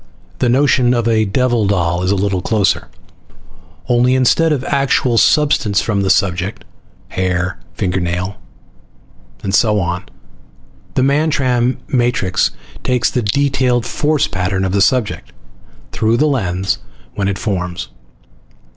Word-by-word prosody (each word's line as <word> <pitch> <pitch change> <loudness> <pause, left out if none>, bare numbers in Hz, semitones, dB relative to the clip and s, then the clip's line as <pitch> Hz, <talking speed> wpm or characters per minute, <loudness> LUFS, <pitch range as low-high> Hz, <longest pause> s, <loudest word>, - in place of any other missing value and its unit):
The 125 - +2
notion 125 -1 +3
of 120 -1 0
a 110 -1 +2
devil 120 +1 +1
doll 85 -3 0
is 90 - -1
a 100 - +2
little 95 -1 -1
closer. 105 0 0 1.0
Only 125 +1 +3
instead 145 +6 +3
of 140 -4 0
actual 135 -3 +1
substance 145 -9 +3
from 105 -3 -1
the 95 - 0
subject 95 -1 0 0.4
hair, 90 0 -2 0.2
fingernail 90 -1 -1
parings, 100 - -23
and 95 - -3
so 105 +1 +3
on 90 +1 -3 0.9
the 130 - +2
Mantram 135 -4 +1
matrix 120 -7 +1 0.3
takes 125 -1 +1
the 125 - 0
detailed 125 +1 +1
force 150 +3 0
pattern 95 0 -1
of 95 - -1
the 100 +1 +1
subject, 125 +1 0 0.6
through 110 +1 +1
the 150 - +3
lens 95 -9 -1 0.3
when 100 -1 -2
it 100 0 -1
forms. 90 - -3
110 Hz, 130 wpm, -16 LUFS, 95-130 Hz, 1.0 s, notion